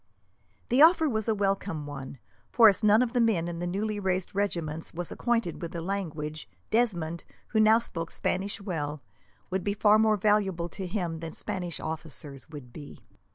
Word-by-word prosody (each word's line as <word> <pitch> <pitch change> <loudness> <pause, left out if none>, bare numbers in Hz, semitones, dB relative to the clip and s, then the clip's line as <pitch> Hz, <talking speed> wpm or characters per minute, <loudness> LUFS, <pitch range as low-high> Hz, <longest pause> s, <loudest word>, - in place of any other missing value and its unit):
The 255 +4 +4
offer 320 0 +7
was 220 -5 -1
a 220 - +2
welcome 195 -5 -1
one, 140 -2 -7 0.3
for, 230 -2 +7
as 205 +1 +3
none 215 +3 +6
of 240 -1 -3
the 245 - +3
men 205 -8 +2
in 170 -1 -5
the 175 - -2
newly 205 +3 -2
raised 190 0 -1
regiments 170 -6 -2
was 175 0 -4
acquainted 230 -8 -1
with 170 -1 -5
the 170 - -3
language, 155 -5 -4 0.2
Desmond, 175 -8 0 0.3
who 220 - +1
now 215 +1 +6
spoke 165 -8 -4
Spanish 195 +2 -2
well, 155 -6 -3 0.5
would 190 0 -1
be 205 0 -1
far 210 +1 +5
more 215 -1 +4
valuable 195 -4 +1
to 190 +2 -6
him 175 -4 -3
than 165 -1 -6
Spanish 180 -5 -4
officers 150 -3 -4
could 145 -6 -11
be. 145 -2 -11
190 Hz, 180 wpm, -28 LUFS, 165-215 Hz, 0.5 s, offer